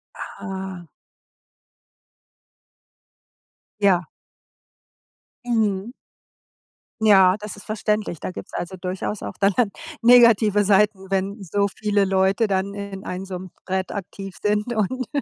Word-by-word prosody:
Ah. 190 -2 -7 3.0
Ja. 185 -3 +4 1.4
Mhm. 220 -2 0 1.1
Ja, 190 -3 +6
das 210 0 -7
ist 205 - -12
verständlich. 210 -5 -2
Da - - -4
gibt's - - -9
also 180 +2 -5
durchaus 185 +3 -4
auch - - -5
dann 195 0 +3
dann 225 -5 +2 0.3
negative 230 -4 +6
Seiten, 200 -1 +2
wenn 195 +2 -1
so 200 +2 0
viele 205 0 0
Leute 190 +3 +2
dann 200 0 -1
in 200 -1 -7
einem 185 +1 -5
so 185 -2 -6
'nem 185 0 -9 0.2
Thread 190 0 -2
aktiv 195 -1 -7
sind 210 +3 0
und 235 +4 -1
200 Hz, 115 wpm, -23 LUFS, 190-210 Hz, 3.0 s, Ja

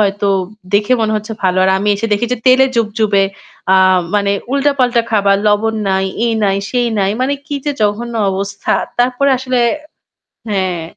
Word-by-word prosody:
হয়তো 200 0 +1 0.5
দেখে 210 +4 +2
মনে 220 -1 0
হচ্ছে 215 +1 -5
ভালো। 185 0 +1
আর 190 - +3
আমি 205 - -1
এসে 225 +3 -2
দেখি 210 +4 +1
যে - - 0
তেলে 260 +1 +6
জুবজুবে 215 -3 +1 0.5
আ - - +6 0.4
মানে 200 -1 +1 0.2
উল্টাপাল্টা 270 -4 +2
খাবার, 200 -2 +3
লবণ 215 +2 +2
নাই, 190 0 +1 0.2
এই 230 - +1
নাই, 195 -1 +1
সেই 245 -1 +1
নাই। 195 0 +1
মানে 275 +2 +1
কি 290 - -4
যে 290 - 0
জঘন্য 230 +3 -1 0.2
অবস্থা! 200 +1 -3 0.3
তারপরে 255 +3 +2
আসলে 255 -1 -1 0.9
হ্যাঁ। 185 -4 -1
215 Hz, 165 wpm, -15 LUFS, 200-245 Hz, 0.9 s, তেলে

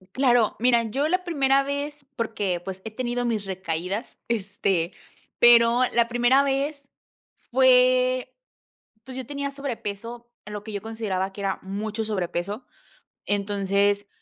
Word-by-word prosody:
Claro, 245 -4 +3
mira, 240 +1 +4
yo 280 +7 0
la 365 +2 0
primera 275 -5 +3
vez, 285 +1 -4
porque, 205 -6 -1
pues, 190 +1 -7
he 220 - -5
tenido 245 +2 -2
mis 220 -4 -1
recaídas, 190 +3 -4
este, 195 -5 -1 0.5
pero 240 0 +6
la 235 -1 +3
primera 245 +3 +4
vez 280 +1 -1 0.6
fue 255 0 +4 0.7
pues, 260 0 -9
yo 260 -2 -5
tenía 280 +1 -3
sobrepeso, 235 -3 -6 0.2
lo 210 -1 -7
que 220 - -7
yo 200 - -3
consideraba 205 -4 -3
que 200 +1 -8
era 195 -1 -1
mucho 210 +3 -4
sobrepeso. 200 +3 -3 0.6
Entonces, 200 0 +1
230 Hz, 130 wpm, -25 LUFS, 200-260 Hz, 0.7 s, pero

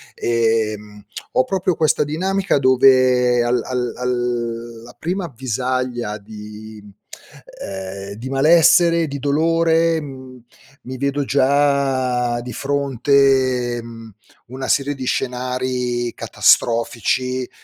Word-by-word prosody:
ehm, 110 -3 -1 0.3
ho - - +3
proprio 185 +4 -1
questa 155 -1 +1
dinamica 190 +5 0
dove 130 -2 +4
al 120 0 +1
al 125 -2 -3
alla 120 -1 -4
prima 180 +3 -3
avvisaglia 125 -3 -3
di 105 +1 -11
mhmm, 105 0 -15 0.7
ehm, 95 +1 -7
di 115 +5 -8
malessere, 165 +4 +4
di 140 -1 -6
dolore, 165 +3 +2
mhmm, 130 -3 -11 0.4
mi 130 +1 -7
vedo 140 +2 -1
già 135 -3 +1
di 125 0 -8
fronte, 135 -2 +1
mhmm, 115 -1 -11 0.3
una 130 +2 -6
serie 140 +1 +1
di 130 -1 -6
scenari 125 -1 -2
catastrofici, 120 +2 +1
125 Hz, 100 wpm, -19 LUFS, 120-140 Hz, 0.7 s, dove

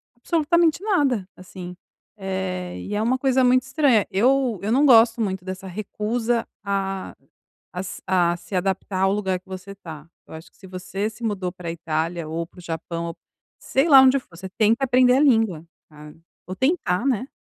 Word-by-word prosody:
absolutamente 330 +5 +1
nada, 280 - +1
assim. 180 -1 -10 0.5
Eh, 185 -2 -4
e 205 - -5
é 210 - 0
uma 240 +4 +1
coisa 260 0 +2
muito 255 0 +4
estranha. 265 -6 +2
Eu 245 +2 +2
eu 205 +2 -2
não 275 +5 +4
gosto 230 -3 +6
muito 190 -3 -2
dessa 190 +1 -6
recusa 220 +4 -2 0.2
a 195 -1 -3 0.6
a 180 - -5
s 185 0 -6
a 175 -2 +2
se 180 +3 -8
adaptar 190 +1 -1
ao 190 - +3
lugar 190 -3 -1
que 185 - -38
você 190 +1 -8
tá. 165 -5 -11 0.2
Eu - - -12
acho 160 +1 -10
que - - -30
se 190 - -14
você 185 +3 -4
se 220 +2 -13
mudou 195 -5 -2
pra 175 -2 -6
Itália, 165 0 -3
ou 165 +2 -3
para 180 - -18
o - - -10
Japão, 170 0 -5
ou 165 - -7 0.4
sei 270 +5 0
lá 270 -3 +9
onde 265 +1 +5
for, 170 -9 -18
você 190 +2 -8
tenta 225 +4 +3
aprender 250 -1 +4
a - - +3
língua, 225 - +2 0.2
tá? 150 -1 -13 0.3
Ou 185 - -5
tentar 260 - 0
né? 255 -2 0
195 Hz, 190 wpm, -23 LUFS, 180-250 Hz, 0.6 s, lá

